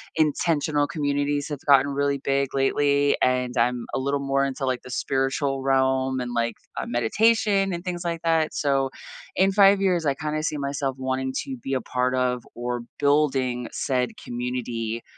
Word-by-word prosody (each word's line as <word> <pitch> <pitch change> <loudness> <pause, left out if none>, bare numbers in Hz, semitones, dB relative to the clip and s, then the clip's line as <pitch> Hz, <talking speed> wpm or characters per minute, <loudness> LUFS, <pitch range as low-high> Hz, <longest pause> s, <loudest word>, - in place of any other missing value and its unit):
intentional 150 -1 +1
communities 145 -1 -1
have 145 -3 -4
gotten 140 0 +6
really 140 0 +1
big 140 -1 0
lately, 140 +1 +2
and 125 0 +1
I'm 120 0 +1
a - - 0
little 140 +1 -1
more 135 0 +1
into, 135 0 -3
like, 130 -1 -1
the 125 - -11
spiritual 135 +1 -1
realm 130 -1 +2
and, 120 -1 -4
like, 115 -1 0 0.2
uh, - - -3
meditation 195 - +2
and 170 +1 -5
things 175 -1 -3
like 170 -1 -2
that. 165 -1 +2
So, 135 -2 +1 0.5
in 190 +1 +3
5 195 0 +5
years, 180 -4 +1
I 135 - +2
kinda 155 +1 -3
see 155 -2 -1
myself 140 -1 -2
wanting 130 0 -2
to 265 -2 -6
be 135 - -5
a 130 - -1
part 125 0 -1
of, 125 -1 0
or 120 0 -3 0.2
building 135 -4 +1
said 125 -2 -1
community, 120 -2 -3
135 Hz, 170 wpm, -24 LUFS, 125-150 Hz, 0.5 s, gotten